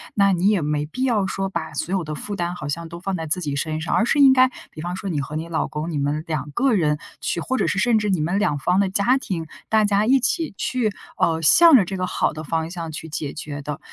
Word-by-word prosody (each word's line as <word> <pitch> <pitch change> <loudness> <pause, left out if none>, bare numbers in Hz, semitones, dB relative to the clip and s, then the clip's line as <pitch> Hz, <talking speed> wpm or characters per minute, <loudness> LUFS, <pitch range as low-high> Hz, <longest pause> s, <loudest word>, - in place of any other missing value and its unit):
那 200 -1 +4
你 180 +2 +1
也 205 -4 +2
没 150 0 -1
必 255 +12 -4
要 220 -7 +1
说 195 0 -2
把 165 -4 -4
所 170 +5 -2
有 190 -3 0
的 155 -1 -5
负 205 +7 -5
担 175 -1 -2
好 145 - -6
像 165 +3 -4
都 170 +1 -8
放 190 +2 -3
在 160 -2 -4
自 155 +4 0
己 145 -5 -3
身 155 +2 -2
上。 160 - -2
而 - - +3
是 235 - +1
应 270 -2 +8
该 260 0 +5 0.2
比 155 - -9
方 175 +2 -4
说 190 +1 -5
你 150 -4 -1
和 145 +3 -6
你 160 +2 -3
老 165 -1 -1
公， 155 +3 -4
你 150 - -2
们 145 +2 -1
两 150 -3 -3
个 265 0 +2
人 155 -7 +2 0.2
去， - - -1
或 255 +10 -2
者 - - +1
是 - - -1
甚 220 +3 +3
至 210 -1 -1
你 185 -4 +1
们 175 +6 0
两 175 -9 +1
方 180 +7 +1
的 200 -1 +2
家 210 +7 +2
庭， 175 -10 -4 0.2
大 220 -1 +4
家 205 +1 +2
一 270 +2 +5
起 310 - -1
去， 245 -4 0 0.3
呃， 160 -1 +2
向 330 - +8
着 215 -8 +5
这 190 +2 -5
个 185 0 -1
好 - - 0
的 155 +1 -7
方 160 +1 -2
向 170 -3 -5
去 155 +1 -7
解 150 -2 -4
决 145 -2 -6
的。 145 0 -5
175 Hz, 300 characters per minute, -22 LUFS, 155-205 Hz, 0.3 s, 应